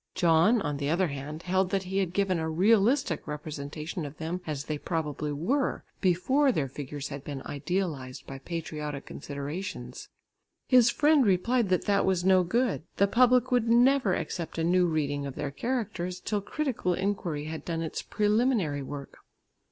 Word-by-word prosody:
John, 175 +7 +4
on 145 -2 -2
the 140 0 -2
other 175 +2 +2
hand, 145 +3 -6
held 185 +1 +1
that 195 0 0
he 190 +1 -2
had 185 -3 0
given 190 -2 +1
a 160 0 -2
realistic 205 - +2
representation 150 +2 -5
of 145 0 -7
them 165 +3 -4
as 145 -3 -3
they 150 -1 -4
probably 150 -3 -2
were, 240 - 0 0.2
before 260 +10 +3
their 150 - -1
figures 140 +1 -6
had 140 -1 -7
been 140 -3 -6
idealised 145 -5 -3
by 135 0 -8
patriotic 150 -2 -5
considerations. 145 +7 -6 0.6
His 250 -3 +6
friend 295 +2 +4
replied 215 +3 +2
that 185 - +1
that 200 -1 +3
was 185 -2 +1
no 190 -1 +6
good; 235 +4 0 0.2
the 200 - +5
public 250 +4 +4
would 240 -2 +2
never 245 -3 +4
accept 170 -2 -4
a 165 - 0
new 180 +1 +3
reading 145 -3 -1
of 135 - -7
their 145 -1 -3
characters 190 - -3
till 205 +2 -2
critical 235 - -1
inquiry 175 -7 -2
had 160 0 -6
done 165 -1 -2
its 160 - -4
preliminary 210 - +1
work. 140 0 -8
175 Hz, 165 wpm, -28 LUFS, 150-210 Hz, 0.6 s, His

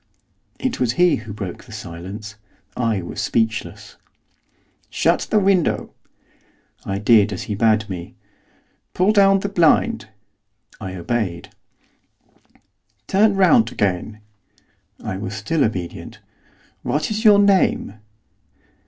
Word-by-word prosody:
It 260 -2 -3
was 125 -2 +1
he 175 +5 +3
who 110 -1 -9
broke 100 -4 -7
the 120 - -15
silence. 105 +2 -8 0.4
I 115 -6 -1
was 85 - -5
speechless. 110 -2 -2 0.9
'Shut - - +1
the 215 - +2
window.' 195 -4 +1 0.9
I 95 - -3
did 105 0 +4
as 90 - -4
he 105 - -4
bade 110 +1 +2
me. 90 -4 -7 0.8
'Pull 185 +3 +3
down 195 -2 +4
the 200 - -2
blind.' 200 +5 +2 0.7
I 95 -3 -6
obeyed. 90 -2 -3 1.6
'Turn 205 - +3
round 195 +5 +4
again.' 100 +2 -2 0.8
I 95 - -4
was 100 +1 -5
still 140 +8 0
obedient. 95 -6 -4 0.6
'What 150 +7 -2
is 215 +1 -2
your 210 -3 +7
name? 195 - +2
110 Hz, 115 wpm, -20 LUFS, -, 1.6 s, your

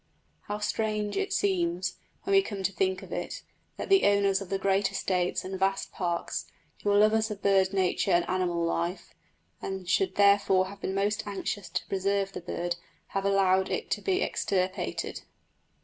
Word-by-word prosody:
How 205 - -2
strange 210 0 -1
it 395 0 -1
seems, 180 -2 0 0.3
when 395 - -1
we 390 - +7
come 205 - -5
to 195 - +1
think 190 -1 0
of - - -8
it, - - -4 0.3
that - - -5
the 390 0 +5
owners 200 -1 +3
of 195 - -7
great 195 +1 +2
estates 180 -1 -1
and 190 0 -5
vast 195 0 0
parks, 175 -2 -2 0.3
who 205 - 0
are 205 - +4
lovers 215 +1 +4
of 205 -2 -7
wild 190 -1 +4
nature 190 0 +1
and 175 -1 +3
animal 175 -2 0
life, 170 +2 -2 0.5
and 190 -2 -5
should 185 +1 +1
therefore 200 -2 +4
have 200 0 -11
been 190 - -2
most 205 +2 0
anxious 200 -1 -4
to - - -2
preserve 195 0 0
this - - -6
bird, 175 0 -2 0.3
have 195 0 -2
allowed 190 -1 +3
it 455 - -3
to - - 0
be 385 0 +1
extirpated! 185 0 -2
195 Hz, 175 wpm, -28 LUFS, 185-205 Hz, 0.5 s, we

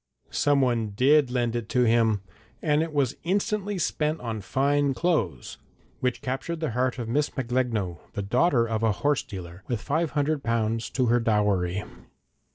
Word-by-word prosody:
Someone 125 -7 +2
did 140 +3 +4
lend 120 -2 0
it 115 -2 -3
to 125 - +3
him, 110 -3 +3 0.4
and 150 -1 +2
it 165 0 -2
was 140 -4 +1
instantly 205 +2 0
spent 155 -2 0
on 115 -3 -4
fine 140 +6 +1
clothes 115 - -1 0.4
which 125 -1 -1
captured 135 +6 -3
the 155 -5 -2
heart 125 +2 0
of 120 -3 -4
Miss 145 +6 +1
Macglegno, 115 -8 -1
the 100 - -3
daughter 120 - +2
of 110 -1 -1
a 110 -2 +2
horse 145 +6 +1
dealer, 90 -3 -9
with 120 -3 -1
five 155 +7 0
hundred 145 0 +1
pounds 115 -2 -1
to 130 - 0
her 120 +1 +3
dowry. 105 -4 +1
125 Hz, 165 wpm, -26 LUFS, 110-145 Hz, 0.4 s, did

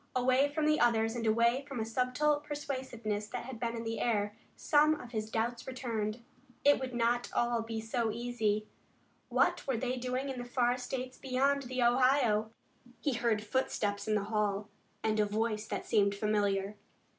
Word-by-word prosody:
Away 255 +3 +3
from 305 +1 0
the 305 0 +3
others 225 -1 +3
and 230 -1 -2
away 235 +4 +3
from 275 -4 -5
a 220 - -1
subtle 255 +6 +1
persuasiveness 260 -8 -4
that 235 - -5
had 255 -3 -7
been 235 -1 -2
in 230 - -4
the 225 0 -3
air, 210 -3 0 0.2
some 305 +1 +4
of 240 - -10
his 215 -2 -3
doubts 235 +2 -2
returned. 235 -3 -3 0.4
It 285 0 +6
would 260 -2 -4
not 240 +1 +1
all 240 -1 +2
be 225 0 -4
so 225 +1 -1
easy. 220 -2 -1 0.6
What - - +2
were 265 -3 +1
they 255 +2 -1
doing 255 +2 -2
in 260 -2 -4
the 245 0 -7
far 245 -1 +2
states 255 +1 -5
beyond 275 +2 +1
the 255 0 0
Ohio? 240 -3 +3 0.5
He 285 - 0
heard 230 -3 +1
footsteps 205 -3 -1
in 215 - +2
the 205 -1 0
hail 210 -1 -1 0.3
and 215 -1 +1
a 210 - +4
voice 215 +1 -1
that - - -4
seemed 200 -2 +3
familiar. 205 -1 0
235 Hz, 180 wpm, -32 LUFS, 215-255 Hz, 0.6 s, It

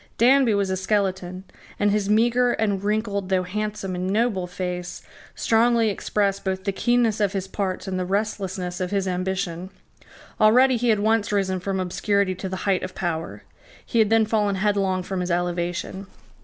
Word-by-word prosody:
Danby 250 -1 +5
was 200 -1 0
a 190 - 0
skeleton; 190 -2 -1 0.4
and 205 0 +3
his 205 -1 0
meagre 240 +3 +3
and 200 -3 -1
wrinkled, 205 -2 -1
though 185 -1 +2
handsome 210 0 -4
and 180 +1 -2
noble, 205 -3 0
face 180 0 -5 0.3
strongly 230 -1 +3
expressed 200 0 -1
both 190 -1 -2
the 200 - 0
keenness 235 +1 +1
of 205 -1 +1
his 190 -1 -3
parts 190 -1 -3
and 185 -1 -2
the 180 - -1
restlessness 190 -2 -2
of 180 - -1
his 195 -1 -1
ambition. 185 -1 -2 0.7
Already 250 +4 +5
he 240 +1 0
had 215 -2 +3
once 220 0 +1
risen 190 -2 0
from 190 +1 -2
obscurity 190 +1 0
to 190 +1 -6
the 190 - -3
height 195 -2 +2
of 185 0 -6
power. 165 -3 -4 0.4
He 235 - 0
had 215 -2 +4
then 225 0 +4
fallen 210 -2 +1
headlong 195 -2 0
from 190 0 -4
his 180 - -3
elevation. 175 +2 -2
195 Hz, 175 wpm, -24 LUFS, 185-215 Hz, 0.7 s, Danby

